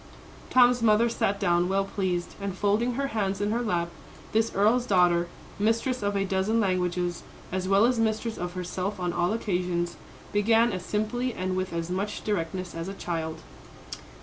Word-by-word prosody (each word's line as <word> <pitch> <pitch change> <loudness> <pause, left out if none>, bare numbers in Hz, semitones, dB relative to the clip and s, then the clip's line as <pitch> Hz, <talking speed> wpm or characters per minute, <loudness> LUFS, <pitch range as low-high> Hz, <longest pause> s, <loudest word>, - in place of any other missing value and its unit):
Tom's 245 -1 +5
mother 225 +1 +4
sat 200 -3 0
down 175 -2 +2
well 195 0 +1
pleased, 185 -3 -2
and 195 -2 -4
folding 215 +5 +1
her 275 +1 -1
hands 195 -4 -1
in 205 +1 0
her 235 +2 0
lap, 175 -7 0 0.4
this 225 +1 +2
earl's 230 +5 +3
daughter, 175 -3 +3 0.3
mistress 230 +4 +1
of 205 0 -1
a 195 0 +1
dozen 195 +4 +1
languages, 180 -3 0 0.3
as 185 0 -2
well 195 +3 +5
as 245 -1 +2
mistress 220 0 0
of 175 0 -4
herself 185 +2 -3
on 175 -1 -1
all 175 +1 +1
occasions, 180 -5 -1 0.4
began 225 +3 +4
as 185 -1 -4
simply 230 +5 -1
and 185 0 -2
with 185 0 -2
as 170 +1 -3
much 200 +3 -3
directness 185 -2 -2
as 165 +1 -5
a 195 - -5
child. 160 -3 -4
195 Hz, 175 wpm, -27 LUFS, 180-220 Hz, 0.4 s, Tom's